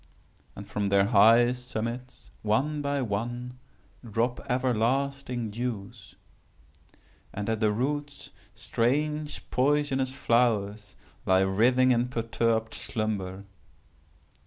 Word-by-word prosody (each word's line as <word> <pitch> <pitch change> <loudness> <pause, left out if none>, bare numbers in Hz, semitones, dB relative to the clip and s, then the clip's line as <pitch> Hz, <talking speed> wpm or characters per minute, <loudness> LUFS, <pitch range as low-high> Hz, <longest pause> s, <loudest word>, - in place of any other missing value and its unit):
And 100 - -9
from 105 0 -2
their 100 0 +4
high 115 +3 +6
summits, 125 0 -6
one 140 +8 0
by 140 -1 -1
one, 120 +4 -4 0.4
drop 115 +2 -1
everlasting 125 0 0
dews. 110 -3 -6 1.2
And 105 0 -5
at 110 -1 0
the 110 -1 +2
roots 145 +5 -3 0.2
strange 150 +5 -1
poisonous 135 -1 +1
flowers 110 -6 0 0.3
lie 95 0 +4
writhing 125 +7 +3
in 120 0 +2
perturbed 115 -1 -1
slumber. 100 -3 -3
120 Hz, 95 wpm, -27 LUFS, 110-130 Hz, 1.2 s, high